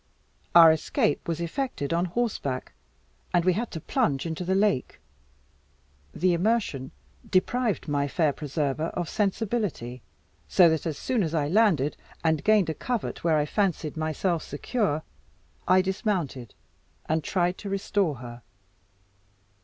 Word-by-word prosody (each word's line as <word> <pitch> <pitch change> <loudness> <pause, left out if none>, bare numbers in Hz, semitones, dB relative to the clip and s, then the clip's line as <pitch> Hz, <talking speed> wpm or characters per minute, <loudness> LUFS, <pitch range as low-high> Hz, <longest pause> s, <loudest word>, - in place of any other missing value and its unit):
Our 165 -2 +10
escape 155 -1 0
was 165 -1 -2
effected 170 - -2
on 170 +2 +1
horseback, 180 - -2 0.6
and 175 -1 +3
we 185 - +4
had 225 +5 -2
to 160 - -6
plunge 140 -2 0
into 165 +2 -3
the 190 +2 0
lake. 195 -9 +1 1.1
The 180 - +1
immersion 175 - 0 0.4
deprived 220 +2 +1
my 145 -1 0
fair 155 0 +1
preserver 150 +1 -2
of 175 -2 -2
sensibility, 200 - -2 0.5
so 175 -3 +6
that 160 0 -1
as 155 -3 -3
soon 250 -4 0
as 165 -3 -1
I 145 -2 +1
landed, 175 -8 +3 0.3
and 160 -2 +1
gained 210 -6 +4
a - - -3
covert 240 +6 -3
where 165 -2 +3
I 150 - +2
fancied 170 -3 -1
myself 160 +2 -1
secure, 155 - -2 0.6
I 185 +1 +5
dismounted, 185 - -2 0.5
and 160 0 0
tried 180 +1 0
to 200 - -6
restore 195 -4 0
her. 120 -1 -9
170 Hz, 140 wpm, -26 LUFS, 150-200 Hz, 1.1 s, Our